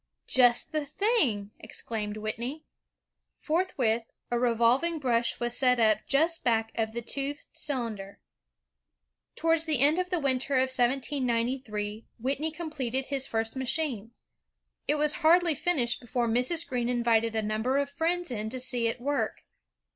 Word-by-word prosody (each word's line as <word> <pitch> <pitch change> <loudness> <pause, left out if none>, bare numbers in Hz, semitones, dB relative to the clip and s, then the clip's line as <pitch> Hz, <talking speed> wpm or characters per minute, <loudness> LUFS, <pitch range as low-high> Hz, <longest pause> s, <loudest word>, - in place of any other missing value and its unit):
''Just 245 +2 +5
the 310 -1 -1
thing!" 285 - 0
exclaimed 210 -2 -5
Whitney. 235 +8 -4 0.7
Forthwith, 290 -9 0 0.3
a 240 - +1
revolving 245 +7 +2
brush 240 -5 0
was 240 0 0
set 250 -2 +4
up 215 -2 +4
just 325 +4 +2
back 225 -2 +1
of 220 -1 -2
the 235 0 -4
toothed 280 +4 -3
cylinder. 230 -9 -3 1.2
Towards 325 0 +1
the 310 -3 +2
end 295 +6 +4
of 365 0 -2
the 360 - 0
winter 270 -1 0
of 260 0 +2
1793, 240 -4 -1
Whitney 275 +6 -1
com 320 0 -7
pleted 265 -2 -2
his 275 -2 -1
first 225 +1 -2
machine. 260 -4 -1 0.8
It 295 - +2
was 300 0 +1
hardly 340 +1 +5
finished 280 -6 0
before 240 0 -1
Mrs. 255 +9 +1
Greene 245 -2 -1
invited 230 -2 +1
a 220 - 0
number 220 +5 0
of 280 0 +1
friends 335 +2 -2
in 215 -2 -3
to 255 +3 -4
see 245 -2 0
it 230 - -2
work. 285 +3 -2
255 Hz, 145 wpm, -28 LUFS, 230-295 Hz, 1.2 s, Just